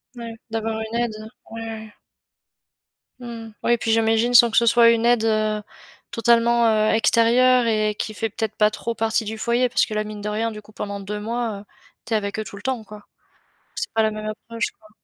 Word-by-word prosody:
Ouais, 235 -1 -7 0.2
d'avoir 225 0 -2
une 220 +1 -3
aide, 235 -2 -1 0.4
ouais, 225 - -6
ouais. 220 -1 -7 1.3
Mmh 245 - -10 0.2
mh. 220 - -14
Oui, - - +2
et 240 - +4
puis 225 0 -1
j'imagine, 225 +2 +2
sans 235 -1 +8
que - - 0
ce 235 - +5
soit 235 0 +6
une 230 0 +1
aide, 240 -2 +3
heu, 215 -1 +1 0.5
totalement, 235 0 +3
heu, 215 -1 +3
extérieure 240 +3 +4
et 215 -2 +1
qui 215 - -4
fait 225 +1 -2
peut-être 220 0 -4
pas 210 0 +4
trop 235 +2 -4
partie 225 0 0
du 220 +1 -5
foyer, 240 +2 +1
parce - - +2
que 215 - -7
là, 215 - 0
mine 210 -1 -8
de 210 - -3
rien, 225 +2 -1
du 210 - -9
coup, 210 - -19
pendant 200 -1 -5
2 210 +1 -5
mois, 230 -1 -3
heu, - - -14 0.4
tu 230 - -4
es - - +4
avec 200 0 -4
eux - - -2
tout 205 - -10
le 200 - -10
temps, 255 -1 -2
quoi. 210 -1 -12 0.7
C'est - - -4
pas 225 - +2
la 220 - +1
même 215 0 -6
approche, 230 +2 -4
quoi. 215 - -20
225 Hz, 230 wpm, -22 LUFS, 215-235 Hz, 1.3 s, sans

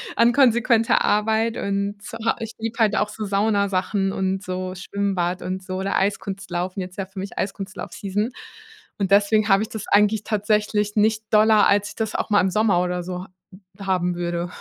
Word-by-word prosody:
an 235 +1 +4
konsequenter 235 -3 +3
Arbeit 220 +2 +1
und 200 +1 -2
z 225 +2 -8
ha 230 - +2
ich 225 -1 -5
liebe 225 +1 -4
halt 215 -2 +3
auch 210 0 +1
so 215 0 -5
Saunasachen 200 -1 +1
und 190 +1 -1
so 185 0 -4
Schwimmbad 190 -2 -2
und 185 +1 -4
so, 185 0 -5
oder 195 +1 -2
Eiskunstlaufen 190 -2 -2
jetzt 180 0 -8
ja 195 - -2
für 195 0 -9
mich 195 +1 -7
Eiskunstlauf-Season 200 +2 -3 0.7
und 195 -1 -1
deswegen 205 +1 +4
habe 195 +2 +4
ich 220 - -6
das 220 -2 -6
eigentlich 210 +1 +3
tatsächlich 210 0 0
nicht 215 +1 +2
doller, 215 0 +5
als 205 0 +2
ich - - -11
das 220 -2 -3
auch - - -2
mal 205 - +5
im 190 - 0
Sommer 200 -3 +2
oder 180 0 -1
so 180 +1 -5
h - - -17 0.6
haben 180 -2 0
würde. 175 0 -3
200 Hz, 185 wpm, -23 LUFS, 190-215 Hz, 0.7 s, doller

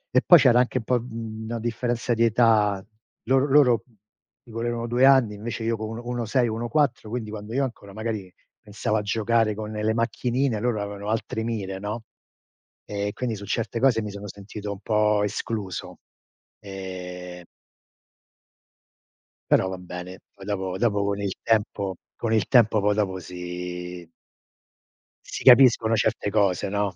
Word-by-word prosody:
E 130 - +6
poi 175 -3 +9
c'era 125 -2 +5
anche 125 +1 +1
un - - -8
po', 125 0 +1
mhmm, 115 -2 -7
una 115 +1 -4
differenza 120 +1 -1
di 115 +1 +2
età. 110 -3 +3 0.4
Lor 135 +2 +3
loro, 125 -5 +5
mhmm, 120 -3 -29 0.5
mi 115 - -14
volerono 115 0 -2
2 120 +3 +3
anni, 130 -6 +5
invece 110 +2 -5
io 115 0 +1
co 110 - -4
1 115 +2 -6
co 120 - -11
1 120 -1 -2
6, 120 +2 +2
1 115 +2 -3
4, 125 -5 +1
quindi 115 -2 -4
quando 105 0 -7
io 135 +2 +1
ancora 100 -5 -9
magari 110 -4 -4 0.3
pensavo 105 +1 -2
a - - 0
giocare 110 +1 +1
con 110 0 -5
le 105 +1 0
macchinine, 120 +1 0
loro 120 -4 0
avevano 100 0 -5
altri 110 0 -2
mire, 100 -5 -3
no, 105 +3 -4 0.8
e 100 0 -3
quindi 120 -3 -3
su 100 0 -8
certe 115 +3 -2
cose 125 -4 +4
mi 105 - -4
sono 100 +1 -8
sentito 100 +1 -7
un 100 - -6
po' 105 0 +2
escluso. 100 -3 -4 0.6
Ehm 90 -2 -8 2.1
Però 95 - +4
va 95 - -5
bene, 90 0 -8 0.2
poi 100 -1 -13
dopo 95 -2 -3
dopo 100 -2 +1
con 100 0 -1
il 100 -2 -1
tempo 100 -3 0 0.2
con 115 -1 -2
il 110 -5 +2
tempo 115 -4 +5
poi 105 0 +2
dopo, 95 -3 -1
si 90 -1 -7 1.2
si - - -6
capiscono 120 -3 +7
certe 110 -1 0
cose, 100 -3 +1
no, 100 -2 -1
110 Hz, 165 wpm, -25 LUFS, 100-115 Hz, 2.1 s, poi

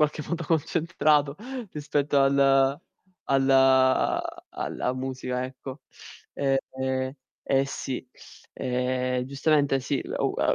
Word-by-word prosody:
qualche 150 0 +1
modo 170 -1 -3
concentrato 155 -2 +1 0.4
rispetto 145 -1 0
al 135 0 +4 0.5
al 135 0 +3 1.0
alla 125 - -3
musica, 130 -1 -3
ecco. 130 +2 -8 0.5
Ehm, 130 -1 -1 0.3
eh 135 0 +2
sì, 130 -2 -5 0.5
ehm, 125 0 -1
giustamente 140 0 +2
sì, 135 +1 -1
lu - - -2
a - - +2
135 Hz, 95 wpm, -26 LUFS, 130-145 Hz, 1.0 s, al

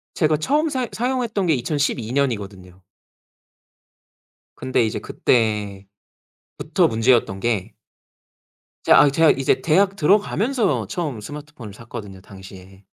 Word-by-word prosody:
제가 155 -2 +2
처음 295 - 0
사용 260 -4 -2
사용했던 240 -5 -2
게 160 - +3
2012 125 -3 -2
년이거든요. 100 -9 -3 1.8
근데 130 -2 0
이제 110 - -3
그때부터 105 -4 -2 0.8
문제였던 115 -3 +1
게 105 -3 -2 1.1
이제 - - -1
아 145 - +6
제가 160 +3 +4
이제 135 -1 0
대학 195 +5 +2
들어가면서 210 - +1
처음 150 - -4
스마트폰을 145 -4 -10
샀거든요, 105 -4 -10
당시에. 95 0 -14
130 Hz, 265 characters per minute, -21 LUFS, -, 1.8 s, 아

